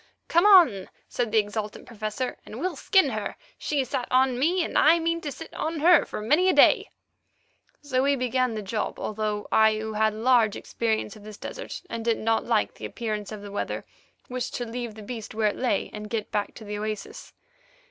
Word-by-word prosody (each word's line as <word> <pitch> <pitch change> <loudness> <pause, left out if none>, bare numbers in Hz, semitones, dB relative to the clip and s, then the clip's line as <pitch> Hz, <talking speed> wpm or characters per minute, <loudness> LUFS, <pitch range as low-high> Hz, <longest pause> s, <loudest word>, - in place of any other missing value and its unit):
"Come 340 +5 +4
on," 320 - +6 0.2
said 240 -3 -2
the 225 - +2
exultant 210 0 -2
Professor, 220 +2 -4
"and 225 - -9
we'll 365 +2 -2
skin 380 -8 +3
her. 215 -2 -4 0.2
She 285 -3 0
sat 250 -1 -3
on 255 -1 +3
me, 345 +6 +2
and - - -7
I 325 +3 +6
mean 335 0 -1
to 295 - -4
sit 325 - -10
on 320 0 -3
her 340 -1 +6
for - - -6
many 300 - +3
a - - +4
day." - - +5 0.9
So 260 -3 0
we 280 +1 +3
began 255 -2 0
the 215 - -4
job, 210 +2 -3
although 210 -1 -3
I, 220 0 +5
who 220 0 -4
had 215 0 +1
large 225 -2 +3
experience 220 -2 -2
of 210 - -14
this 210 -1 -10
desert, - - -7
and 230 -6 -5
did 230 -1 +1
not 225 0 +1
like 225 -3 +1
the - - -8
appearance 215 -3 -4
of 210 -1 -7
the 205 - -8
weather, 205 - -3 0.4
wished 255 0 -4
to 245 - -3
leave 235 -1 -5
the 215 - -10
beast 220 -1 -7
where 215 -1 +2
it - - -5
lay 245 -6 -1
and 210 0 -7
get 220 -2 -3
back 205 -1 -2
to 225 - -10
the 210 0 -5
oasis. 215 -1 -6
225 Hz, 210 wpm, -26 LUFS, 215-265 Hz, 0.9 s, on